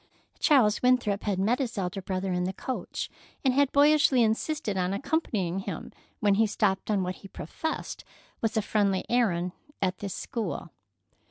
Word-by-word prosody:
Charles 240 Hz, -8 st, +4 dB
Winthrop 245 Hz, -5 st, +3 dB
had 200 Hz, -3 st, 0 dB
met 215 Hz, +7 st, +2 dB
his 245 Hz, -5 st, -2 dB
elder 195 Hz, 0 st, -2 dB
brother 185 Hz, 0 st, -2 dB
in 180 Hz, 0 st, 0 dB
the 190 Hz, -, -2 dB
coach, 260 Hz, -, -4 dB, 0.4 s
and 260 Hz, -, +4 dB
had 280 Hz, 0 st, +3 dB
boyishly 285 Hz, -3 st, +5 dB
insisted 220 Hz, 0 st, 0 dB
on 185 Hz, 0 st, 0 dB
accompanying 200 Hz, -, -1 dB
him 195 Hz, -, -6 dB, 0.3 s
when 205 Hz, -3 st, +3 dB
he 220 Hz, +2 st, +3 dB
stopped 200 Hz, -2 st, 0 dB
on 200 Hz, -3 st, +2 dB
what 180 Hz, 0 st, -3 dB
he 195 Hz, -, -12 dB
professed 310 Hz, -, -5 dB, 0.4 s
was 225 Hz, -1 st, 0 dB
a 220 Hz, -, +2 dB
friendly 200 Hz, -3 st, +1 dB
errand 180 Hz, -8 st, +2 dB, 0.3 s
at 185 Hz, -1 st, -1 dB
this 200 Hz, -2 st, -4 dB
school. 230 Hz, -3 st, -4 dB
210 Hz, 165 wpm, -28 LUFS, 190-250 Hz, 0.4 s, boyishly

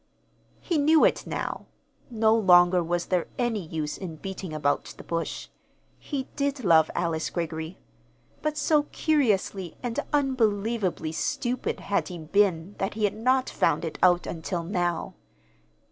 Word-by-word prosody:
He 335 Hz, -4 st, 0 dB
knew 310 Hz, +2 st, +5 dB
it -, -, +1 dB
now. -, -, -4 dB, 0.4 s
No 220 Hz, -2 st, +3 dB
longer 180 Hz, -4 st, +5 dB
was 175 Hz, +1 st, -1 dB
there 180 Hz, -2 st, 0 dB
any 235 Hz, -5 st, 0 dB
use 155 Hz, -2 st, -4 dB
in 175 Hz, -4 st, -6 dB
beating 190 Hz, +1 st, -6 dB
about 150 Hz, -2 st, 0 dB
the -, -, -10 dB
bush. 165 Hz, 0 st, -4 dB, 0.5 s
He 270 Hz, -3 st, -4 dB
did 280 Hz, -2 st, -1 dB
love 160 Hz, -4 st, +5 dB
Alice 165 Hz, -2 st, -1 dB
Greggory; 160 Hz, 0 st, -4 dB, 0.6 s
but 305 Hz, 0 st, -2 dB
so 300 Hz, -2 st, +2 dB
curiously 205 Hz, -, 0 dB
and 240 Hz, -2 st, -2 dB
unbelievably 225 Hz, -, 0 dB
stupid 245 Hz, +9 st, -2 dB
had 200 Hz, -, 0 dB
he 180 Hz, -, -6 dB
been 170 Hz, +2 st, +1 dB
that 195 Hz, +1 st, -2 dB
he 215 Hz, -, -3 dB
had 205 Hz, -, +2 dB
not 255 Hz, +4 st, +2 dB
found 160 Hz, 0 st, +1 dB
it 160 Hz, -, -6 dB
out 180 Hz, -1 st, +4 dB
until 170 Hz, +1 st, -4 dB
now. 175 Hz, -1 st, -1 dB
190 Hz, 145 wpm, -26 LUFS, 170-240 Hz, 0.6 s, knew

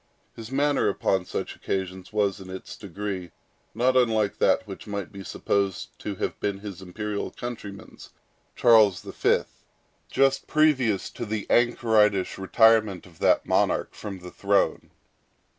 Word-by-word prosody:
His 115 Hz, -1 st, -9 dB
manner 145 Hz, +2 st, +2 dB
upon 95 Hz, -2 st, 0 dB
such -, -, -4 dB
occasions 95 Hz, +1 st, -4 dB
was, 100 Hz, -2 st, 0 dB
in 95 Hz, -1 st, -10 dB
its 95 Hz, 0 st, -8 dB
degree, 100 Hz, -2 st, -5 dB, 0.5 s
not 130 Hz, +2 st, +2 dB
unlike 110 Hz, -5 st, +2 dB
that 110 Hz, -, +3 dB
which 100 Hz, +1 st, -9 dB
might 100 Hz, -3 st, -4 dB
be 100 Hz, -1 st, -9 dB
supposed 100 Hz, 0 st, -1 dB
to -, -, -5 dB
have -, -, -3 dB
been 100 Hz, -1 st, -1 dB
his 100 Hz, -2 st, -8 dB
imperial 105 Hz, +3 st, -4 dB
countryman's, 110 Hz, -5 st, -8 dB, 0.5 s
Charles 110 Hz, -6 st, +5 dB
V., -, -, +1 dB, 0.7 s
just 135 Hz, 0 st, +2 dB
previous 130 Hz, -10 st, +2 dB
to -, -, -6 dB
the 110 Hz, -2 st, -3 dB
anchoritish 110 Hz, -6 st, +3 dB
retirement 110 Hz, -1 st, +3 dB
of 85 Hz, -3 st, -18 dB
that -, -, +3 dB
monarch -, -, +1 dB
from 100 Hz, -3 st, -7 dB
the 90 Hz, -1 st, -10 dB
throne. 100 Hz, 0 st, 0 dB
105 Hz, 140 wpm, -26 LUFS, 95-115 Hz, 0.7 s, Charles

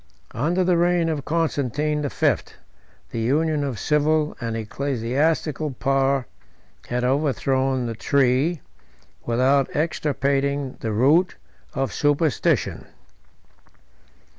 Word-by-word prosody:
77 120 Hz, -, -4 dB
Under 180 Hz, +2 st, +2 dB
the 180 Hz, -1 st, +2 dB
reign 175 Hz, -1 st, +2 dB
of 150 Hz, -4 st, -3 dB
Constantine 150 Hz, -2 st, 0 dB
the 145 Hz, -, -2 dB
Fifth, -, -, 0 dB, 0.6 s
the 115 Hz, -, -3 dB
union 150 Hz, +5 st, +1 dB
of 135 Hz, -5 st, -3 dB
civil 150 Hz, +4 st, +1 dB
and 115 Hz, -1 st, -3 dB
ecclesiastical 140 Hz, +6 st, -1 dB
power 135 Hz, 0 st, +1 dB, 0.6 s
had 125 Hz, 0 st, -2 dB
overthrown 130 Hz, -1 st, +1 dB
the 115 Hz, -, -3 dB
tree, 135 Hz, +6 st, +1 dB, 0.7 s
without 130 Hz, +3 st, +2 dB
extirpating 140 Hz, -3 st, 0 dB
the 110 Hz, -, -3 dB
root, 145 Hz, -, +3 dB, 0.4 s
of 135 Hz, 0 st, -1 dB
superstition. 145 Hz, 0 st, +1 dB
140 Hz, 105 wpm, -23 LUFS, 130-155 Hz, 0.7 s, root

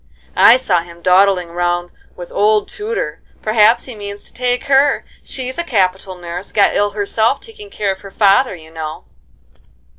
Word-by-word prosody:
"I 235 Hz, -, +7 dB
saw 190 Hz, -10 st, +1 dB
him 170 Hz, 0 st, -14 dB
dawdling 185 Hz, -1 st, +3 dB
round 175 Hz, 0 st, -2 dB, 0.2 s
with 175 Hz, -1 st, -9 dB
old 210 Hz, 0 st, +2 dB
Tudor, 435 Hz, +3 st, -4 dB, 0.2 s
perhaps 215 Hz, +1 st, +4 dB
he 255 Hz, -, -8 dB
means 205 Hz, -1 st, -8 dB
to -, -, -18 dB
take 245 Hz, 0 st, -1 dB
her: 275 Hz, 0 st, +2 dB, 0.2 s
she's 260 Hz, +2 st, -4 dB
a -, -, 0 dB
capital 190 Hz, -, -1 dB
nurse, 175 Hz, +2 st, -7 dB
got 205 Hz, -, +3 dB
ill 205 Hz, 0 st, +2 dB
herself 220 Hz, +5 st, +1 dB
taking 430 Hz, -2 st, -13 dB
care 205 Hz, -, -2 dB
of 190 Hz, -, -7 dB
her 200 Hz, -, -10 dB
father, 200 Hz, +3 st, +3 dB
you 160 Hz, -2 st, -15 dB
know." 160 Hz, -1 st, -6 dB
200 Hz, 170 wpm, -17 LUFS, 180-245 Hz, 0.2 s, I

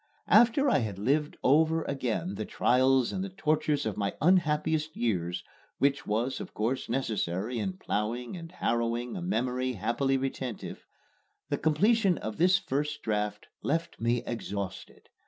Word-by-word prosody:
After 240 Hz, +6 st, +5 dB
I 200 Hz, -, +4 dB
had 105 Hz, -5 st, -3 dB
lived 145 Hz, +8 st, 0 dB
over 160 Hz, +4 st, +4 dB
again 110 Hz, -10 st, -2 dB
the 110 Hz, -, -4 dB
trials 130 Hz, +2 st, +3 dB
and 190 Hz, -, -2 dB
the 195 Hz, -, -4 dB
tortures 155 Hz, -6 st, 0 dB
of 110 Hz, -, -2 dB
my 100 Hz, -1 st, -1 dB
unhappiest 155 Hz, -2 st, +2 dB
years 90 Hz, -6 st, -1 dB, 0.3 s
which 140 Hz, +1 st, +1 dB
was 120 Hz, +5 st, 0 dB
of -, -, -8 dB
course 115 Hz, +5 st, -1 dB
necessary 115 Hz, -2 st, -1 dB
in 95 Hz, -3 st, -2 dB
ploughing 115 Hz, -, -3 dB
and 165 Hz, -1 st, -8 dB
harrowing 120 Hz, -6 st, -1 dB
a 185 Hz, -, -4 dB
memory 130 Hz, -7 st, -1 dB
happily 120 Hz, +6 st, 0 dB
retentive 130 Hz, -3 st, -5 dB, 0.6 s
the -, -, -1 dB
completion 195 Hz, +5 st, +3 dB
of 110 Hz, 0 st, -5 dB
this 185 Hz, +3 st, +5 dB
first 145 Hz, -2 st, -2 dB
draft 105 Hz, -1 st, -2 dB
left 165 Hz, -2 st, -2 dB
me 120 Hz, +1 st, +1 dB
exhausted. 100 Hz, -5 st, -5 dB
130 Hz, 145 wpm, -29 LUFS, 110-155 Hz, 0.6 s, After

